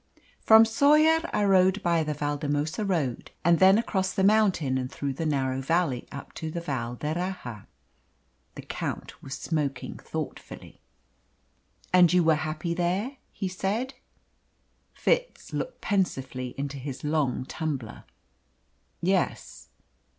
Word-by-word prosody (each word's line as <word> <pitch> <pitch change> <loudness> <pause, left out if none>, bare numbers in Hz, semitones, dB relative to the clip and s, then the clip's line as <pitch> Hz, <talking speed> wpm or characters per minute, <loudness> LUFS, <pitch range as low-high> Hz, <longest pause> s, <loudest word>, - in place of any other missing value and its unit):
"From 220 0 +7
Soller 305 +7 +4
I 210 - +1
rode 190 0 +4
by 170 -2 +2
the 150 -1 -3
Valdemosa 145 +4 -1
road, 160 - -1 0.2
and 170 -1 +5
then 190 +2 +7
across 190 -4 0
the 190 - 0
mountain 190 -11 +3
and 130 0 -4
through 140 -1 -3
that 160 +4 -2
narrow 135 -3 0
valley 155 -3 0
up 140 - -9
to 160 - -3
the 170 - -4
Val 130 -7 -3
d'Erraha." 155 - -4 0.9
The - - -8
Count - - -5
was 135 - -6
smoking 145 -6 -3
thoughtfully. - - -7 1.1
"And 180 -2 +7
you 180 -1 +4
were 160 0 +5
happy 155 +2 -2
there?" 185 +10 -1
he 195 - -3
said. 200 +8 -2 1.0
Fitz - - -1
looked - - -4
pensively 135 - -1
into 140 0 -4
his 135 0 -6
long 150 -4 0
tumbler. 135 -6 -5 1.0
"Yes." 75 - -1
165 Hz, 130 wpm, -27 LUFS, 140-190 Hz, 1.1 s, From